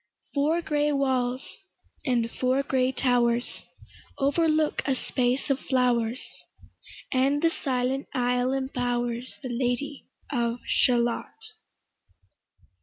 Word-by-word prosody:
Four 310 Hz, +4 st, +1 dB
gray 295 Hz, -1 st, +1 dB
walls, 260 Hz, -2 st, 0 dB, 0.6 s
and 240 Hz, -5 st, +1 dB
four 260 Hz, +2 st, +1 dB
gray 260 Hz, -2 st, +1 dB
towers, 245 Hz, -2 st, +1 dB, 0.6 s
Overlook 310 Hz, +2 st, +2 dB
a 270 Hz, -, +2 dB
space 255 Hz, +2 st, 0 dB
of 270 Hz, -, +1 dB
flowers, 250 Hz, -2 st, +1 dB, 0.9 s
And 275 Hz, +3 st, +2 dB
the 330 Hz, -, +4 dB
silent 260 Hz, -2 st, -1 dB
isle 250 Hz, -1 st, +1 dB
imbowers 245 Hz, -2 st, -2 dB
The 255 Hz, -, -4 dB
Lady 250 Hz, +3 st, -2 dB, 0.2 s
of 235 Hz, -3 st, 0 dB
Shalott. 240 Hz, -2 st, +2 dB
255 Hz, 100 wpm, -27 LUFS, 245-275 Hz, 0.9 s, the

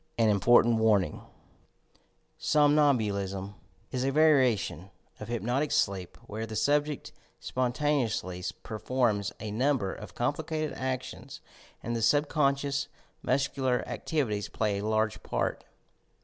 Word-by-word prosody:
AN 115 Hz, -2 st, +4 dB
IMPORTANT 115 Hz, +3 st, +5 dB
WARNING 105 Hz, -4 st, +2 dB, 1.2 s
Somnambulism 110 Hz, -10 st, +2 dB, 0.4 s
is 125 Hz, 0 st, -1 dB
a 135 Hz, -, +1 dB
variation 130 Hz, -, +3 dB, 0.3 s
of 105 Hz, -, -7 dB
hypnotic 120 Hz, +5 st, -1 dB
sleep 100 Hz, -, 0 dB
where 110 Hz, +2 st, -5 dB
the 110 Hz, -, -6 dB
subject 145 Hz, +6 st, 0 dB, 0.3 s
spontaneously 125 Hz, -8 st, -1 dB, 0.2 s
performs 110 Hz, -2 st, 0 dB
a 110 Hz, -1 st, -5 dB
number 120 Hz, -3 st, +1 dB
of -, -, -10 dB
com -, -, +1 dB
plicated 155 Hz, -1 st, -3 dB
actions 130 Hz, 0 st, -5 dB, 0.4 s
and 120 Hz, -, -2 dB
the 115 Hz, -, -2 dB
subconscious 140 Hz, +1 st, +1 dB, 0.3 s
muscular 130 Hz, -1 st, 0 dB
activi 150 Hz, -7 st, -2 dB
ties 105 Hz, -1 st, -3 dB
play 105 Hz, -2 st, -1 dB
a 100 Hz, -, -4 dB
large 110 Hz, 0 st, 0 dB
part. -, -, -2 dB
120 Hz, 115 wpm, -29 LUFS, 105-140 Hz, 1.2 s, IMPORTANT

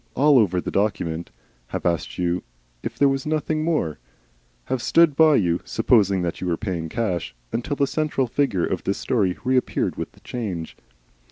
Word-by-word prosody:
all 140 Hz, 0 st, +5 dB
over 95 Hz, -5 st, +2 dB
the -, -, -4 dB
document, 85 Hz, -5 st, -1 dB, 0.4 s
have -, -, -5 dB
asked 85 Hz, -2 st, -1 dB
you 90 Hz, 0 st, 0 dB, 0.4 s
if -, -, -5 dB
there 140 Hz, -, +5 dB
was 135 Hz, +1 st, -1 dB
nothing 155 Hz, 0 st, 0 dB
more, 155 Hz, -, 0 dB, 0.6 s
have 125 Hz, -, -2 dB
stood 165 Hz, 0 st, +4 dB
by 155 Hz, 0 st, +6 dB
you 85 Hz, -6 st, +1 dB
supposing 100 Hz, -5 st, +2 dB
that 85 Hz, -, -3 dB
you 90 Hz, -, -2 dB
were 85 Hz, -2 st, 0 dB
paying 85 Hz, -6 st, -3 dB
cash 90 Hz, -, -2 dB, 0.2 s
until 120 Hz, +5 st, -2 dB
the 140 Hz, -, +2 dB
central 150 Hz, -2 st, 0 dB
figure 120 Hz, -7 st, 0 dB
of 90 Hz, -, -3 dB
this 100 Hz, -, -1 dB
story 100 Hz, -7 st, 0 dB
reappeared 130 Hz, 0 st, 0 dB
with -, -, -5 dB
the -, -, -20 dB
change. 95 Hz, -10 st, -5 dB
110 Hz, 175 wpm, -23 LUFS, 90-140 Hz, 0.6 s, by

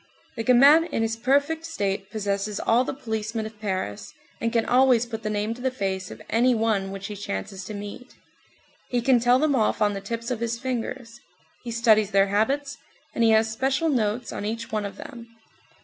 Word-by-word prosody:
The 225 Hz, -, -3 dB
gamin 280 Hz, +7 st, +6 dB
in 230 Hz, -9 st, -2 dB
his 225 Hz, 0 st, -1 dB
perfect 280 Hz, +7 st, +1 dB
state 200 Hz, -11 st, -3 dB
possesses 205 Hz, -1 st, -2 dB
all 235 Hz, +2 st, +3 dB
the -, -, -3 dB
policemen 220 Hz, -3 st, -4 dB
of 215 Hz, -1 st, -10 dB
Paris, 185 Hz, -, -3 dB, 0.3 s
and 230 Hz, -, 0 dB
can 230 Hz, -1 st, +1 dB
always 250 Hz, -2 st, +4 dB
put 225 Hz, -2 st, -6 dB
the 215 Hz, -, -3 dB
name 210 Hz, +1 st, -1 dB
to 245 Hz, -, -11 dB
the 260 Hz, -, +1 dB
face 190 Hz, -6 st, -3 dB
of -, -, -10 dB
any 245 Hz, +2 st, +3 dB
one 220 Hz, -4 st, 0 dB
which 195 Hz, 0 st, -7 dB
he 210 Hz, -, -5 dB
chances 190 Hz, -, -5 dB
to 215 Hz, -, -6 dB
meet. 205 Hz, +5 st, -9 dB, 0.7 s
He 245 Hz, -, +1 dB
can 250 Hz, 0 st, +4 dB
tell 245 Hz, +2 st, +4 dB
them 295 Hz, +1 st, +2 dB
off 220 Hz, -4 st, +1 dB
on 205 Hz, -1 st, +2 dB
the 195 Hz, -, -5 dB
tips 230 Hz, +4 st, -4 dB
of 240 Hz, -, -2 dB
his 235 Hz, 0 st, -2 dB
fingers. 240 Hz, -1 st, -5 dB, 0.4 s
He 240 Hz, -, -6 dB
studies 225 Hz, -3 st, +3 dB
their 195 Hz, -1 st, +3 dB
habits, 275 Hz, +8 st, 0 dB, 0.4 s
and 235 Hz, -, +1 dB
he 225 Hz, -, +5 dB
has 220 Hz, 0 st, +3 dB
special 270 Hz, +7 st, 0 dB
notes 235 Hz, -3 st, -1 dB
on -, -, -5 dB
each 230 Hz, +2 st, -4 dB
one 210 Hz, -2 st, -1 dB
of 200 Hz, -, -11 dB
them. 235 Hz, -3 st, -10 dB
225 Hz, 205 wpm, -25 LUFS, 205-250 Hz, 0.7 s, gamin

